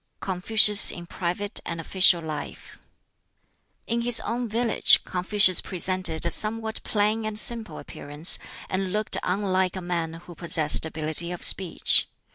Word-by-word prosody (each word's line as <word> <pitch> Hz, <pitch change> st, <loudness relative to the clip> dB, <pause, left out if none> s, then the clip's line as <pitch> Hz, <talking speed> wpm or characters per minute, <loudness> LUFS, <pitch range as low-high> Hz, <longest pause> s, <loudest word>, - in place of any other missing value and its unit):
"] -, -, -51 dB
BOOK -, -, -14 dB
X -, -, -7 dB
Confucius 205 Hz, +2 st, +3 dB
in 175 Hz, -, -10 dB
Private 180 Hz, +4 st, -3 dB
and 170 Hz, -1 st, -6 dB
Official 175 Hz, 0 st, +2 dB
Life 155 Hz, -2 st, -9 dB, 1.1 s
In 235 Hz, +1 st, -3 dB
his 240 Hz, 0 st, +4 dB
own 240 Hz, 0 st, -5 dB
village, 230 Hz, +2 st, +2 dB
Confucius 185 Hz, 0 st, +3 dB
presented 185 Hz, -3 st, 0 dB
a 170 Hz, -, 0 dB
somewhat 220 Hz, +2 st, -1 dB
plain 215 Hz, +1 st, -2 dB
and 215 Hz, -1 st, -5 dB
simple 225 Hz, 0 st, 0 dB
appearance, 145 Hz, +4 st, -1 dB, 0.3 s
and 190 Hz, 0 st, -4 dB
looked 215 Hz, +1 st, -1 dB
unlike 185 Hz, -1 st, -2 dB
a -, -, -5 dB
man 170 Hz, -2 st, -4 dB
who 175 Hz, +1 st, -13 dB
possessed 160 Hz, -2 st, +2 dB
ability 160 Hz, +2 st, 0 dB
of 175 Hz, -, -8 dB
speech. 185 Hz, -3 st, +2 dB
185 Hz, 150 wpm, -23 LUFS, 170-215 Hz, 1.1 s, his